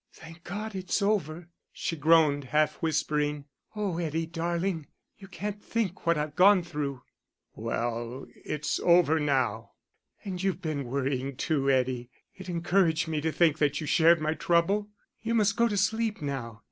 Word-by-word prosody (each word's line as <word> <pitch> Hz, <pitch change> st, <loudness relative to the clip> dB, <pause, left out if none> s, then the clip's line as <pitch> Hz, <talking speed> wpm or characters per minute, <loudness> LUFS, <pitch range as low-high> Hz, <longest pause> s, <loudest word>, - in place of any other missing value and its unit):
"Thank 165 Hz, +1 st, -13 dB
God, 210 Hz, +4 st, -5 dB
it's 185 Hz, +1 st, -1 dB
over," 175 Hz, -5 st, -1 dB, 0.2 s
she 165 Hz, -, -3 dB
groaned, 155 Hz, -2 st, +4 dB
half 150 Hz, +3 st, +1 dB
whispering. 150 Hz, -2 st, -1 dB, 0.3 s
"Oh, 200 Hz, -5 st, -2 dB
Eddie, 165 Hz, -1 st, -1 dB
darling, 170 Hz, 0 st, -2 dB, 0.3 s
you 195 Hz, -, -11 dB
can't 205 Hz, +2 st, -5 dB
think 205 Hz, -7 st, -3 dB
what 170 Hz, -1 st, +4 dB
I've 150 Hz, 0 st, -3 dB
gone 190 Hz, 0 st, +6 dB
through." 145 Hz, -6 st, -4 dB, 0.5 s
"Well, 115 Hz, +2 st, -3 dB
it's 150 Hz, -1 st, -3 dB
all 170 Hz, -, +5 dB
over 160 Hz, -2 st, +3 dB
now." 135 Hz, -8 st, 0 dB, 0.5 s
"And 185 Hz, -3 st, -4 dB
you've 190 Hz, -2 st, 0 dB
been 150 Hz, -4 st, -2 dB
worrying 135 Hz, +1 st, -2 dB
too, 140 Hz, -1 st, 0 dB
Eddie. 125 Hz, -2 st, +1 dB, 0.2 s
It 190 Hz, -1 st, -10 dB
encouraged 170 Hz, -1 st, +1 dB
me 155 Hz, -2 st, -1 dB
to 160 Hz, +1 st, 0 dB
think 160 Hz, -2 st, +2 dB
that 145 Hz, -1 st, +1 dB
you 155 Hz, -, -4 dB
shared 165 Hz, +2 st, +5 dB
my 155 Hz, +1 st, 0 dB
trouble. 175 Hz, +6 st, +1 dB, 0.3 s
You 230 Hz, +1 st, -1 dB
must 210 Hz, -2 st, +3 dB
go 235 Hz, 0 st, +3 dB
to 205 Hz, -3 st, -2 dB
sleep 220 Hz, +2 st, 0 dB
now. 130 Hz, -6 st, -5 dB
160 Hz, 160 wpm, -28 LUFS, 145-185 Hz, 0.5 s, gone